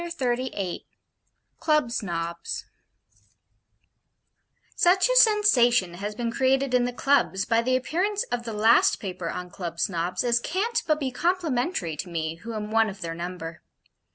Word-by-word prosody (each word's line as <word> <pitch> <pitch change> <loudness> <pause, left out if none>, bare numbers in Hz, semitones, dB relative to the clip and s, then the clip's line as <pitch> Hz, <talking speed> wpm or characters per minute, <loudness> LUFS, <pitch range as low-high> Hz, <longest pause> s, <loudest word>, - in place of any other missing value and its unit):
CHAPTER 275 -8 -1
XXXVIII 205 -8 -4 0.7
CLUB 305 -6 +2
SNOBS 170 -5 -4 2.1
Such 370 +4 +4
a - - +1
Sensation 265 - +4
has 205 +4 -5
been 235 0 -2
created 265 +1 +1
in 250 -1 +3
the 245 - -2
Clubs 245 -6 +1
by 230 0 +2
the 255 +2 +1
appearance 370 +10 0
of 245 -1 -1
the 230 -1 -6
last 220 +2 +4
paper 180 -4 -5
on 180 +1 -6
Club 170 -2 -6
Snobs, 175 0 -1
as 240 -1 +2
can't 400 - -1
but 310 -1 +2
be 270 -3 -2
complimentary 295 - -1
to 175 +4 -5
me 160 -1 -3
who 230 +6 -7
am 210 0 -5
one 225 0 +3
of 195 -1 -10
their 165 -1 -4
number. 170 -1 -6
235 Hz, 155 wpm, -25 LUFS, 180-275 Hz, 2.1 s, Such